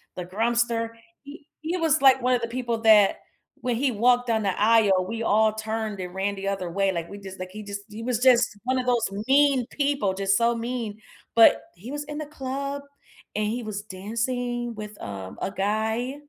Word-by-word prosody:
the 180 - -5
Grumpster, 230 +3 0 0.3
he 285 +1 -12 0.2
he 330 +3 -2
was 315 -3 +2
like 265 -1 +7
one 255 +1 +2
of 245 - +1
the 230 - -2
people 235 -1 -2
that, 215 -3 +6 0.4
when 245 -1 0
he 260 +2 +1
walked 245 +2 +3
on 220 -1 +1
the 195 -1 -1
aisle, 210 -4 +4
we 230 +2 -4
all 215 0 +3
turned 220 -2 -4
and 180 0 -6
ran 195 +1 -1
the 195 0 -5
other 195 -3 -2
way, 195 +1 +1
like, 170 -2 -4
we 200 - -9
just 190 -1 -10
like 185 0 -6
he 210 +2 -8
just 200 0 -6
he 210 +2 -8
was 245 -2 0
just 245 -4 +4
one 255 +1 0
of 250 - -4
those 240 -2 +2 0.2
mean 275 -3 +4
people, 280 -9 0
just 195 0 +1
so 235 0 +2
mean, 230 -2 -4 0.4
but, 230 - +7
he 215 +10 -9
was 295 0 -4
in 295 0 -6
the 305 - -4
club, 280 0 -4 0.5
and 215 0 0
he 235 +3 -2
was 205 -1 -5
dancing 235 +4 -3
with, 210 -1 -8
um, 95 -2 -7
a - - -1
guy, 220 +6 -1
225 Hz, 205 wpm, -25 LUFS, 200-250 Hz, 0.5 s, like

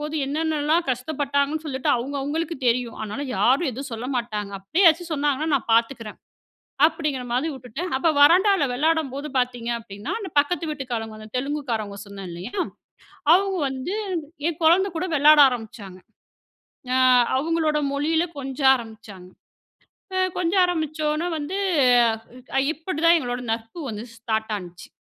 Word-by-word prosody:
போது 300 +1 -5
என்னென்னல்லா 310 +1 0
கஷ்டப்பட்டங்கணு 280 +3 -1
சொல்லிட்டு, 265 -3 -3
அவங்க 265 +4 -4
அவங்களுக்கு 320 +4 -2
தெரியும். 240 0 0
அதனால 215 +7 -5
யாரும் 275 +6 +3
எதுவும் 270 +3 -7
சொல்லமாட்டாங்க. 235 -4 -3
அப்டியே 320 - +1
ஏதாச்சும் 330 0 +3
சொன்னாங்கனா, 290 +1 0
நான் 245 - -1
பாத்துக்குறேன்" 230 -2 -1 0.7
அப்டிங்கற 305 -5 -2
மாரி 260 +7 0
வுட்டுட்டேன். 265 +6 -6
அப்போ 320 +5 +2
வராண்டால 365 +1 +5
விளையாடும்போது 300 0 0
பாத்தீங்க 245 -2 -1
அப்டின்னா, 205 -2 -7
அந்தப் 375 -7 -8
பக்கத்து 330 +3 -2
வீட்டுக்காரங்க, 225 -6 -5
தெலுங்கு 290 +3 -2
காரங்க 210 -3 -3
சொன்னே 200 -1 -9
இல்லையா? 180 - -7 0.8
அவங்க 390 0 +2
வந்து 265 +8 -4 0.5
என் 335 -1 -5
குழந்த 370 +5 +4
கூட 360 +3 -1
விளையாட 295 +1 +7
ஆரம்பிச்சாங்க. 215 -6 -7 1.0
அ - - +3 0.4
அவங்களோட 310 0 0
மொழியில 320 +4 +1
கொஞ்ச 270 +1 -6 0.2
ஆரம்பிச்சாங்க. 220 -6 -10 0.9
அ - - +2 0.2
கொஞ்ச 355 0 0
ஆரம்பிச்சோன 310 -1 -1
வந்து, 310 +7 -4 1.0
அ - - +5
இப்டி 320 +1 -5
தான் 340 - +7
எங்களோட 245 -1 -4
நட்பு 225 +8 -9
வந்து 215 +2 -6
ஸ்டார்ட் 220 -1 -2
ஆன்ச்சு. 175 -2 -11
280 Hz, 130 wpm, -23 LUFS, 235-315 Hz, 1.0 s, விளையாட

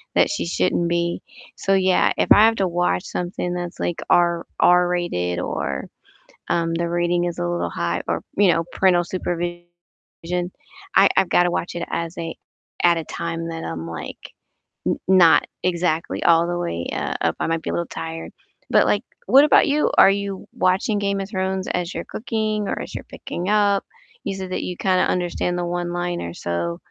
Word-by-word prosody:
that - - +4
she 305 - -2
shouldn't 175 0 +1
be. 170 0 -1 0.4
So, 195 - +1
yeah, 185 -1 +3
if - - 0
I 215 - +9
have 225 0 +4
to 190 -3 +1
watch 170 - 0
something 180 0 -3
that's, 175 -1 -5
like, 175 - -2
R 170 -1 +3
R-rated 175 - +2
or, 70 -5 -3 0.6
um, 165 -1 +1
the 170 0 -1
rating 175 0 +1
is 175 - -4
a 85 - -1
little 85 0 -1
high 85 +1 -2
or, 85 0 -1 0.2
you 200 -3 +5
know, 165 0 0
parental 180 -2 +3
supervision, 175 -1 -3 1.3
I 195 +1 +7
I've 190 - +3
gotta 175 0 +3
watch 170 - -3
it 170 - -4
as 170 0 -3
a 165 -1 -4 0.5
at 170 -1 +5
a 160 - -4
time 165 0 -4
that 165 0 -5
I'm, 80 0 -5
like, 85 -1 -6 0.7
n - - +1
not 185 -3 +6 0.2
exactly 170 -2 0
all 170 0 +4
the 175 0 -2
way, 85 - -3
uh, - - -2
up. 80 - +1
I - - 0
might 165 0 -1
be - - -5
a - - -3
little 170 - -1
tired. 165 0 -6 0.4
But, - - +5
like, - - +2 0.3
what 275 +2 +7
about - - +5
you? 295 +1 +2
Are - - +8
you 200 -1 -3
watching 200 +4 +1
"Game 200 -1 0
of 195 0 -5
Thrones" 190 -2 -2
as 180 0 -2
you're - - -5
cooking 215 -2 -2
or - - -2
as - - -8
you're - - -5
picking 180 +3 -5
up? 205 -2 +3 0.4
You 195 - -3
said 190 -1 -6
that - - -2
you 180 - -5
kinda 185 -1 +2
understand 175 0 -1
the 175 - -1
one-liner, 175 - -3
so 85 0 -3
175 Hz, 185 wpm, -22 LUFS, 165-190 Hz, 1.3 s, I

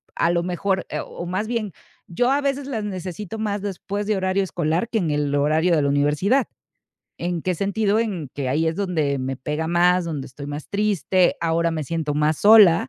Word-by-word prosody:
a 165 - +2
lo 170 0 +1
mejor, 185 +1 -1
eh, - - -3
o - - -7
a - - -5
más 185 +5 -2
bien 230 -4 -2 0.3
yo 245 +9 0
a 285 +1 +2
veces 275 0 -1
las 225 -6 -3
necesito 190 +1 -5
más 205 -2 -2
después 200 +1 -4
de 215 - +1
horario 190 +1 +1
escolar 170 +2 -1
que 225 -2 0
en 170 - -1
el 145 -1 0
horario 155 +4 +2
de 150 - +2
la 140 - +1
universidad. 150 - +2 0.7
¿En 175 -1 -2
qué 185 +2 -1
sentido? 200 +3 +1
En 185 - -3
que 135 -3 -2
ahí 155 +5 +1
es 160 - 0
donde 160 -8 0
me 130 0 -3
pega 150 +5 -3
más, 175 +1 +3
donde 150 -5 -4
estoy 140 +2 -9
más 145 +1 -6
triste. 195 -3 +1
Ahora 170 0 +1
me 160 -2 -3
siento 155 -1 -2
más 150 +1 +1
sola 205 -9 +7
175 Hz, 210 wpm, -22 LUFS, 155-205 Hz, 0.7 s, sola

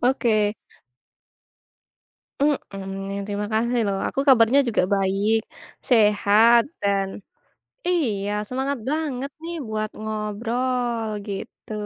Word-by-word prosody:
Oke. 250 -1 +2 2.1
Mmm, 195 -8 -2
terima 205 0 -3
kasih 235 +3 +1
lho. 200 - 0 0.2
Aku - - -2
kabarnya 250 +2 +6
juga 220 - +2
baik, 195 +3 +2 0.5
sehat, 220 0 +5 0.2
dan 195 -1 +1 0.8
iya, 220 - 0 0.2
semangat 265 +3 -2
banget 285 -3 -2
nih 340 +1 -5
buat 215 0 -2
ngobrol, 230 +3 -2 0.2
gitu. 200 +2 -7
225 Hz, 90 wpm, -23 LUFS, 205-255 Hz, 2.1 s, kabarnya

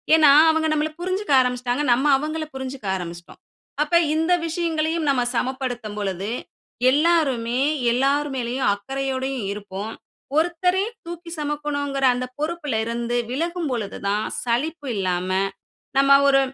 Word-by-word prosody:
ஏன்னா 310 -3 +7 0.2
அவுங்க 320 0 +2
நம்மள 305 +1 0
புரிஞ்சுக்க 370 +1 -2
ஆரம்பிச்சுடாங்க, 250 +2 -1
நம்ம 260 +4 0
அவுங்கள 310 +3 -3
புரிஞ்சுக்க 265 -5 -6
ஆரம்பிச்சுடோம். 175 -1 -9 0.4
அப்ப 300 +3 -1 0.2
இந்த 325 +3 +2
விஷயங்களையும் 325 -1 -1
நம்ம 260 -3 +2
சமப்படுத்தும் 250 -5 -3
பொழுது, 195 0 -3 0.6
எல்லாருமே 270 -6 +2 0.3
எல்லார் 275 +4 +2
மேலயும் 245 0 0
அக்கறையோடையும் 265 +2 -3
இருப்போம். 205 +1 -6 0.4
ஒருத்தரே 360 +4 +2 0.2
தூக்கி 340 0 -8
செமக்கணுங்கிற 290 -2 -2
அந்த 250 +1 -2
பொறுப்புல 305 -4 -2
இருந்து 235 +1 -2 0.2
விலகும் 335 +3 -2
பொழுது 215 -5 -3
தான் 210 +2 +1 0.2
சளிப்பு 285 +5 -1
இல்லாம, 185 -2 -1 0.7
நம்ம 275 0 +7
ஒரு 275 -1 +5
275 Hz, 120 wpm, -23 LUFS, 240-315 Hz, 0.7 s, ஏன்னா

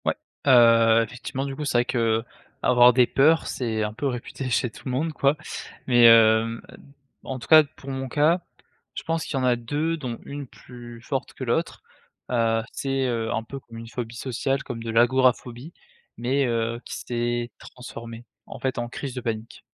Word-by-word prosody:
Ouais, - - +1 0.3
heu, 115 -3 +6
effectivement, 125 +4 -5
du 135 -1 -5
coup, 150 - -5
c'est 135 - +1
vrai 120 - +3
qu'avoir 120 +1 +2
des 125 0 +5
peurs, 160 +4 +3
c'est 110 -4 -2
un 105 0 -3
peu 140 +6 -2
réputé 125 +1 -5
chez 125 0 +1
tout - - -14
le 130 - -3
monde, 155 +5 -1
quoi. 140 0 +2 0.5
Mais 120 -2 +7
heu, 115 0 +5 0.6
en 130 - -5
tout 115 - -11
cas, 155 -1 +8
pour 140 -1 -13
mon 135 0 -4
cas, 155 +7 +2 0.5
je - - -5
pense 165 -1 -2
qu'il 145 - -3
y - - -2
en - - 0
a 125 -1 +3
2 145 +8 -2
dont 125 -6 -5
une 140 -1 -7
plus 120 -2 -12
forte - - -4
que - - -6
l'autre. - - -2 0.5
Heu, 115 -2 +1
c'est, 135 -1 -2
heu, 115 -2 -2
un 110 - -1
peu 135 +5 -8
comme 115 -3 -13
une 115 0 -8
phobie 120 -1 -6
sociale, 135 +2 -2
comme 115 -3 -6
de 115 - -4
l'agoraphobie 125 +4 +2 0.4
mais 135 +3 +1
heu, 115 -1 -1
qui - - -6
s'est 120 0 -2
transformée, 115 -2 -10 0.2
en - - -10
fait, 130 -1 -2
en 120 0 -3
crise 135 +1 -6
de 125 - -4
panique. 115 -1 -5
120 Hz, 190 wpm, -24 LUFS, 115-135 Hz, 0.6 s, cas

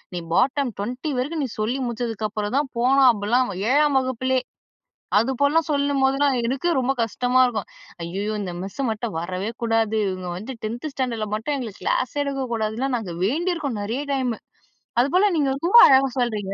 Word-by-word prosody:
நீ - - -2
பாட்டம் 270 +5 +2
20 250 +9 -4
வரைக்கும் 295 +4 -2
நீ - - -6
சொல்லி 235 +5 -1
முடிச்சதுக்கு 225 -2 -3
அப்புறம் 210 +2 -3
தான் 285 -2 -3
போணும். 260 +2 +5
அப்பிடிலாம் 230 +2 0 0.2
7ஆம் 290 0 +4
வகுப்பிலே! 260 0 0 0.8
அது 230 +5 +1
போலலாம் 300 +3 +3
சொல்லும்போதெல்லாம் 280 -1 +2
எனக்கே 270 +8 0
ரொம்ப 260 +1 +1
கஷ்டமா 245 +3 +1
இருக்கும். 220 -5 -3 0.4
"ஐயய்யோ! 195 +5 -3
இந்த 185 -3 -4
மிஸ்ஸ 195 +9 -4
மட்டும் 220 -1 -4
வரவே 185 +5 -3
கூடாது. 225 -1 +1
இவுங்க 185 -1 -4
வந்து 215 +8 -6
டென்த் 235 +7 -4
ஸ்டாண்டர்ல 245 -5 -2
மட்டும் 220 +7 -2
எங்களுக்கு 235 -7 -7
கிளாஸே 260 +3 0
எடுக்க 275 -2 -2
கூடாதுன்னு." 220 +1 -2
லாம் 265 -2 0
நாங்க 190 -7 -6
வேண்டியிருக்கோம் 305 - -1
நிறைய 235 +8 -3
டைம் 260 -3 0 0.7
அதுபோல 365 +11 +3
நீங்க 285 -3 +2
ரொம்ப 345 +10 +4
அழகா 270 0 +5
சொல்றீங்க. 210 -5 -1
250 Hz, 165 wpm, -23 LUFS, 215-275 Hz, 0.8 s, போணும்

